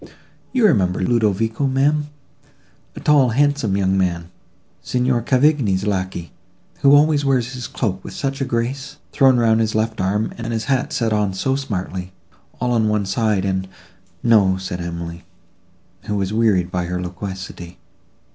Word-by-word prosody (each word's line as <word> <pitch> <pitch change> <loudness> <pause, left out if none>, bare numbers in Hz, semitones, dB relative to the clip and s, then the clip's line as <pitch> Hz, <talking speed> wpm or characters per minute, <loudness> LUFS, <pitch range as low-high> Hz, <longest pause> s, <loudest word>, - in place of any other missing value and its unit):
You 250 -4 +3
remember 95 - +2
Ludovico, 110 +4 +1
ma'am—a 145 +2 -4
tall, 145 -4 +4
handsome 135 -5 +1
young 95 -1 +1
man—Signor 95 +8 -3
Cavigni's 125 -6 +2
lacquey—who 95 +8 -1
always 145 0 +4
wears 130 -3 +1
his 125 -1 -5
cloak 95 -6 -3
with - - -9
such 135 0 -3
a - - +1
grace, 135 +4 -3
thrown 135 -2 +4
round 115 -2 +3
his 110 -1 0
left 110 -1 -1
arm, 105 +4 0
and 115 0 -4
his 110 -1 -2
hat 135 +2 0
set 115 -7 0
on 105 -3 0
so 135 +7 0
smartly, 95 -8 -4 0.5
all 125 0 0
on 110 -3 +2
one 105 -1 0
side, 105 -1 0
and—" 95 -1 -1 0.6
"No," 100 -5 +4
said 90 -1 -5
Emily, 85 0 -6 0.8
who 105 - -2
was 100 0 -1
wearied 100 -6 +2
by 90 -1 -1
her 90 +1 -3
loquacity. 90 -1 -7
110 Hz, 145 wpm, -20 LUFS, 95-130 Hz, 0.8 s, tall